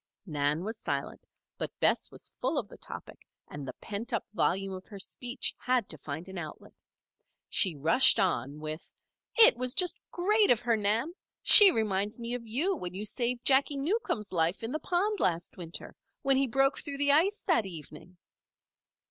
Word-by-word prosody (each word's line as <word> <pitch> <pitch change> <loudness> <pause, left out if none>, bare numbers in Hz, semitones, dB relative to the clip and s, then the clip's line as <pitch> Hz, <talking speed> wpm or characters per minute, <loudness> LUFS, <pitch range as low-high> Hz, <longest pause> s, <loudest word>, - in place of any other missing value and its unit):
Nan 150 -1 -2
was 220 +2 -6
silent; 140 -1 -5 0.3
but - - -6
Bess - - +1
was - - -10
full - - -1
of - - -3
the - - -13
topic - - -10 0.3
and 145 -2 -9
the - - -6
pent 215 +3 -7
up 230 - -2
volume 195 -1 -1
of 185 0 -9
her 205 - -11
speech 245 +6 -3
had 250 -4 0
to - - 0
find 155 +5 -7
an 190 -1 -7
outlet. 155 -3 -10 0.8
She 185 -6 +2
rushed 165 - +6
on 150 -7 -1
with: 155 +1 -7 0.4
"It 465 +1 +9
was 255 0 0
just 360 -2 +2
great 415 +4 +1
of 240 - +4
her, 235 -2 +1
Nan! 220 +9 -1 0.3
She 415 -3 +10
reminds 210 - -2
me 235 0 -5
of 240 -2 -6
you 310 - 0
when 180 - -6
you 205 +3 -5
saved 240 +3 -2
Jacky 280 +1 +3
Newcomb's 275 - -3
life 170 +4 -1
in 225 - -4
the 310 - -3
pond 395 +5 -1
last 170 -1 -2
winter 170 -2 -8 0.3
when 275 -1 +2
he 270 0 +1
broke 270 +3 0
through 285 -2 -7
the 285 0 +2
ice 370 +9 +2
that 320 - +1
evening." 180 +1 -11
225 Hz, 180 wpm, -28 LUFS, 180-275 Hz, 0.8 s, She